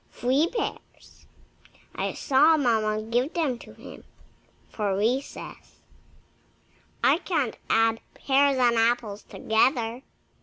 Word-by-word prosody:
Three 265 +6 +1
pears 475 - -7 0.7
I - - -3
saw 300 +4 +3
Mamma 215 -5 0
give 245 +8 -1
them 285 -8 -1
to - - -13
him - - -12 0.6
for 200 -3 -2
recess. 245 +7 -4 1.2
I - - +4
can't 300 - -2
add 225 0 +2
pears 275 0 +2
and 240 -2 +3
apples 225 -2 0
together." 230 +1 0
245 Hz, 105 wpm, -25 LUFS, 225-280 Hz, 1.2 s, I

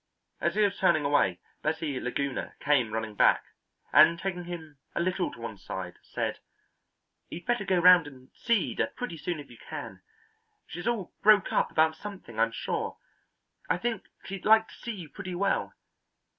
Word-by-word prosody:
As - - 0
he 215 - +4
was 200 -1 +1
turning 155 -6 +3
away 140 -11 +2 0.2
Bessie 155 -3 -1
Laguna 135 +2 -3
came 135 -6 +2
running 110 -1 -3
back, - - +4 0.5
and 155 +4 +7
taking 180 -1 -4
him 160 -5 -8 0.2
a - - 0
little 185 +1 0
to - - -12
one 115 -3 -6
side 90 -1 -6
said: - - -3 0.9
"You'd 175 - -8
better 240 -4 +1
go 190 -1 +2
round 175 -2 +7
and 130 -2 -14
see 230 -5 +1
Ida - - 0
pretty 245 -8 -4
soon 165 +1 -3
if 140 -3 -11
you 120 - -14
can. - - -8 0.6
She's 175 - -6
all 230 -6 -1
broke 210 -2 +5
up - - +2
about 160 0 +3
something, 190 - -8
I'm 115 0 +3
sure. - - -3 0.7
I 145 - +3
think 225 +1 -3 0.2
she'd 195 -1 -6
like 220 +1 +5
to - - -14
see 235 - -6
you 180 -6 -8
pretty 185 +3 -7
well. 195 +2 0
170 Hz, 175 wpm, -29 LUFS, 140-195 Hz, 0.9 s, and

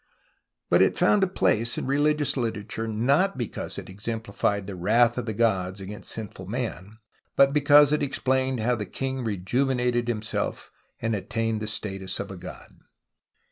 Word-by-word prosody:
But - - +5
it - - +3
found 210 - +4
a - - +3
place 115 - +1
in - - -2
religious 145 +1 +2
literature, 115 -2 -3
not 140 - +2
because 120 -5 -4
it - - -7
exemplified 100 0 -2
the 100 -1 -6
wrath 115 +6 +3
of 120 - -5
the 110 - -1
gods 95 -4 +1
against 100 +2 -8
sinful 100 -4 -6
man, 110 -2 -4 0.4
but 140 0 +5
because 145 0 +6
it 150 - +2
explained 130 -2 0
how 125 +3 +2
the 105 -3 -5
king 130 -1 -3
rejuvenated 120 +4 0
himself 110 -3 -3 0.3
and 115 0 0
attained 110 +2 -2
the 110 - -3
status 95 -3 -4
of 100 0 -5
a - - -7
god. 90 +1 -11
115 Hz, 160 wpm, -26 LUFS, 105-130 Hz, 0.4 s, because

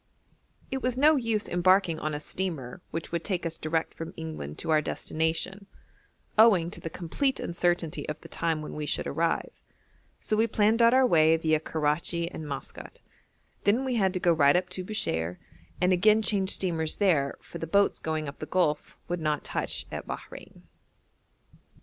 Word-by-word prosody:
It 265 0 -2
was 250 -1 -1
no 305 +3 +6
use 230 -5 0
embarking 175 -2 +3
on 155 -1 -2
a - - -3
steamer 160 -3 -4
which 165 -1 -5
would 170 -1 -2
take 180 -2 -2
us 165 -1 -4
direct 160 +1 -1
from 165 - -7
England 155 - -6
to - - -2
our 155 -1 +4
destination, 165 +6 -2 0.7
owing 190 -7 +6
to - - -8
the 165 - -4
complete 260 - -1
uncertainty 175 -2 -1
of 150 - -4
the - - -11
time 165 -2 -1
when - - -7
we 150 -1 -4
should - - -1
arrive, 165 0 -1 0.6
so 215 - -1
we 220 +2 +3
planned 220 +1 +2
out 230 +2 +6
our 260 0 +6
way 160 -7 +5
viâ 160 -1 +1
Karachi 160 +3 0
and 155 - -7
Maskat; 140 - -8 0.6
then 230 +7 +2
we 260 - -1
had 195 -5 +2
to - - 0
go 175 -1 +3
right 145 -2 +5
up 180 +1 +1
to 185 - -5
Bushire, 90 - -2 0.4
and 180 +1 +3
again 215 +4 +4
change 195 -3 +2
steamers 165 -5 0
there, 155 -9 +2
for - - -10
the 165 - -4
boats 200 +5 +3
going 155 -1 -2
up 140 - -8
the 155 - -6
Gulf 155 -5 0
would 175 -1 -3
not 150 -2 0
touch - - -2
at - - -6
Bahrein. - - -9
170 Hz, 180 wpm, -28 LUFS, 155-200 Hz, 0.7 s, no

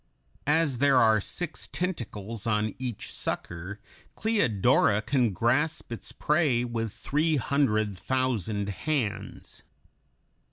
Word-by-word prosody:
As 150 -4 +2
there 140 -1 +5
are 110 -3 +5
six 175 - -3
tentacles 115 - -4
on 105 -1 +1
each 125 -5 -5
sucker, 85 +4 -4 0.4
Cleodora 120 - +3
can 125 0 +2
grasp 120 - 0
its 115 - -6
prey 150 -6 +2
with 115 -3 -2
three 155 +7 0
hundred 110 -8 +1
thousand 110 -6 -1
hands. 125 0 -3
120 Hz, 105 wpm, -28 LUFS, 105-145 Hz, 0.4 s, there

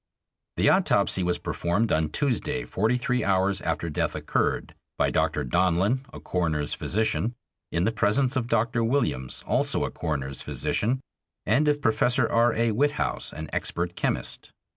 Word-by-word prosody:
The - - +3
autopsy 95 - +3
was 90 -1 +1
performed 100 +7 -1
on 80 0 +2
Tuesday, 145 - -1
forty 110 +5 +1
three 125 0 0
hours 95 0 +2
after 80 0 -2
death 75 - -1
occurred, - - -1 0.2
by - - +2
Dr. 75 - +1
Donlin, 95 - +2
a - - -9
coroner's 80 -5 -1
physician, 110 +3 -1 0.4
in 85 - 0
the 110 - +2
presence 125 +6 +2
of 125 -3 0
Dr. 115 +1 +1
Williams, 115 - -1
also - - +1
a - - -4
coroner's 70 -5 -3
physician, 125 +5 -1 0.4
and 135 +8 +3
of 145 -1 +1
Professor 120 +2 +3
R. 120 +1 +3
A. 115 0 +2
Witthaus, 145 +7 0
an 80 +1 -6
expert 85 +1 -2
chemist. - - -2
110 Hz, 150 wpm, -26 LUFS, 85-125 Hz, 0.4 s, The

